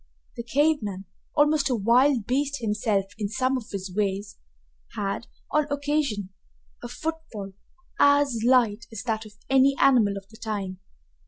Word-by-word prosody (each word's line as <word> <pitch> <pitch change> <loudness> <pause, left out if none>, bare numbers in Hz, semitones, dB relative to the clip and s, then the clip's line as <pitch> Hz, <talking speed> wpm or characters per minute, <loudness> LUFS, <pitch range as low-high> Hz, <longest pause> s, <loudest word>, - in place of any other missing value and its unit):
The - - -4
cave 290 +6 +2
man, 195 -2 -5 0.3
almost 295 -1 +3
a 250 - +2
wild 235 +3 +3
beast 280 +3 0
himself 210 -3 0
in 205 -2 -2
some 260 +4 0
of 250 -4 -5
his 190 -2 -5
ways, 205 0 -2 0.6
had, 200 +3 -3 0.2
on 300 -1 +2
occasion, 285 -9 -1 0.5
a - - -6
footfall 315 -12 -6 0.5
as 285 -5 +4
light 230 -4 +3
as 220 -2 -6
that 220 -2 -2
of 210 - -16
any 270 +1 +4
animal 225 -7 +4
of 195 0 -9
the 220 - -15
time. 205 -5 -4
230 Hz, 150 wpm, -25 LUFS, 205-275 Hz, 0.6 s, as